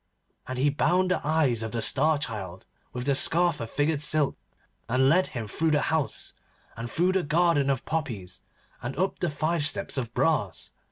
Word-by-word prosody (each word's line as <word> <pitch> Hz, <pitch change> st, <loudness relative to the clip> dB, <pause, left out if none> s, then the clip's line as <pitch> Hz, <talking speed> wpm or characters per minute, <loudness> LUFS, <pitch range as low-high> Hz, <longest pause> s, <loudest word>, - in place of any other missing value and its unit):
And 130 Hz, -, -4 dB
he 140 Hz, +3 st, +2 dB
bound 180 Hz, +6 st, +1 dB
the -, -, 0 dB
eyes 145 Hz, -6 st, +1 dB
of 110 Hz, 0 st, -4 dB
the 115 Hz, -, -1 dB
Star 155 Hz, +3 st, +3 dB
Child 100 Hz, -9 st, -6 dB, 0.3 s
with 125 Hz, 0 st, -5 dB
the 140 Hz, -, +2 dB
scarf 170 Hz, +3 st, +3 dB
of 115 Hz, -, -5 dB
figured 145 Hz, +2 st, 0 dB
silk, 150 Hz, -1 st, +1 dB, 0.5 s
and 130 Hz, +2 st, +3 dB
led 185 Hz, +5 st, +3 dB
him 115 Hz, -4 st, -6 dB
through 160 Hz, +10 st, 0 dB
the 150 Hz, -1 st, +3 dB
house, 160 Hz, -3 st, -1 dB, 0.4 s
and 115 Hz, +1 st, -6 dB
through 175 Hz, +7 st, +1 dB
the 190 Hz, 0 st, +1 dB
garden 160 Hz, -2 st, +2 dB
of 135 Hz, -2 st, -1 dB
poppies, 110 Hz, -, -4 dB, 0.4 s
and 120 Hz, +2 st, -5 dB
up 190 Hz, +3 st, -1 dB
the 175 Hz, -, 0 dB
five 155 Hz, +2 st, -1 dB
steps 160 Hz, -1 st, +1 dB
of 120 Hz, -3 st, -5 dB
brass. 130 Hz, -, 0 dB
145 Hz, 185 wpm, -26 LUFS, 125-160 Hz, 0.5 s, Star